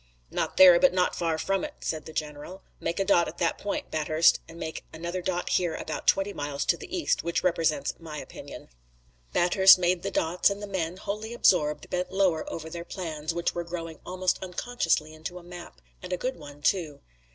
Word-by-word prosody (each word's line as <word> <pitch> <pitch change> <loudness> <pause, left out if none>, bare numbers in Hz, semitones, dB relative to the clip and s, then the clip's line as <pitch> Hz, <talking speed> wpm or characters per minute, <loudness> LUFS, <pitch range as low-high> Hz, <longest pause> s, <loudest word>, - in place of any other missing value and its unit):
"Not - - -2
there, 180 -2 +9
but 275 - +4
not 180 -1 +2
far 165 -2 0
from 195 +4 0
it," 300 -1 -5
said 155 -1 -3
the - - -7
general. 155 +4 -6 0.2
"Make 170 +2 -2
a 195 - +1
dot 175 -3 +4
at 170 - -8
that 170 - 0
point, 205 - -4
Bathurst, 155 +1 +3
and 165 - -11
make 160 -1 -5
another 170 +3 -4
dot 180 -1 -2
here 175 -3 +1
about - - -5
twenty 195 +1 +3
miles 145 -1 -3
to - - +3
the 405 - -10
east, 335 - 0
which 170 +1 -1
represents 165 -3 +1
my 160 -2 -8
opinion." - - -9 0.6
Bathurst 190 +2 +7
made 180 0 +1
the - - -2
dots 170 +5 +2
and 200 0 -4
the 205 - -5
men, 185 -3 -3
wholly 215 +4 -5
absorbed, 150 -9 +3
bent 180 0 -2
lower 190 -5 +1
over 160 -1 -6
their 170 +1 -6
plans, 160 -4 -4
which 170 +1 -1
were 175 - -3
growing 165 -2 -6
almost 185 0 -1
unconsciously 180 -5 -1
into 160 +3 -7
a 180 - -11
map, 175 - -11 0.2
and - - -8
a 180 - 0
good 255 +7 -2
one 145 -1 -12
too. 160 -7 0
175 Hz, 205 wpm, -27 LUFS, 160-185 Hz, 0.6 s, there